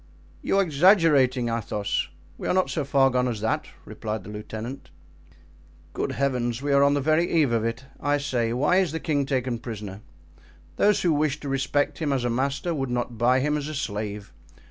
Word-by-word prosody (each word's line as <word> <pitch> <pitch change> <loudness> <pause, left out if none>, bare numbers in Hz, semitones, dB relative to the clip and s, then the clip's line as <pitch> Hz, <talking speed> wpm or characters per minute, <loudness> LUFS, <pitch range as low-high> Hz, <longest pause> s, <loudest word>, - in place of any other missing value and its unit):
"You - - +1
are 195 - +5
exaggerating, 150 - +4
Athos; 105 -3 -2 0.3
we - - -6
are - - +1
not 185 - +2
so 155 - -1
far 135 -1 +3
gone 125 0 +1
as 115 -4 -2
that," 110 - -1 0.2
replied 110 -2 -5
the 105 - -9
lieutenant. 110 +5 -7 1.0
"Good 135 - -2
heavens! 125 -4 -1
we 140 +1 -1
are 140 - +5
on 140 0 +4
the 145 - 0
very 155 +4 +2
eve 155 -7 +3
of 115 -2 +1
it. 115 +4 -3
I 145 0 +1
say, 125 -5 -1
why 135 +9 +2
is 185 -5 +1
the 160 - -2
king 145 -4 0
taken 125 -3 -1
prisoner? 105 -4 -7 0.8
Those 210 0 +3
who 170 -3 +3
wish 150 -1 0
to 145 - -5
respect 145 +1 0
him 155 -3 -1
as 130 -3 0
a 120 - 0
master 140 +7 -1
would 135 -4 -2
not 120 -2 -3
buy 125 +2 +3
him 150 +2 +1
as 145 -1 -3
a 155 - -5
slave. 105 - -4
135 Hz, 200 wpm, -25 LUFS, 120-145 Hz, 1.0 s, are